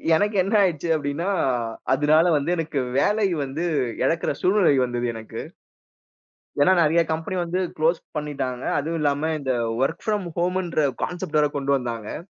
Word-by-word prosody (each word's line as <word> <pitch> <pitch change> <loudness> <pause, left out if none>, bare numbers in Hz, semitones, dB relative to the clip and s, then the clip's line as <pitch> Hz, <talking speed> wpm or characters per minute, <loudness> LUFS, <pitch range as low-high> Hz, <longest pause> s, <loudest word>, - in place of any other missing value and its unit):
எனக்கு 205 +4 +1
என்ன 200 +4 -3
ஆயிர்ச்சு 170 -2 -1
அப்டின்னா, 150 +5 -2 0.6
அதுனால 150 +4 +4
வந்து 145 +4 -2
எனக்கு 160 -3 -2 0.2
வேலை 210 +4 +2 0.2
வந்து 145 +6 -3 0.4
எழக்கிற 165 0 0
சூழ்நெலை 185 -6 +4
வந்தது 120 0 -2
எனக்கு. 110 -1 -7 1.2
ஏன்னா 165 +6 +5
நெறைய 165 +1 +4
கம்பெனி 165 +4 -3
வந்து 175 +2 -2 0.2
க்ளோஸ் 160 +2 +2 0.2
பண்ணிட்டாங்க. 135 -4 -3 0.2
அதுவும் 165 +3 -2
இல்லாம 145 +2 +1
இந்த 135 -2 -2 0.3
ஒர்க் 150 +5 0
ஃப்ரம் 210 -4 0
ஹோம்ன்ற 175 -4 0 0.2
கான்செப்ட் 175 -4 -2
வேற 150 - +4
கொண்டு 140 0 0
வந்தாங்க. 115 0 -5
155 Hz, 140 wpm, -23 LUFS, 140-175 Hz, 1.2 s, ஏன்னா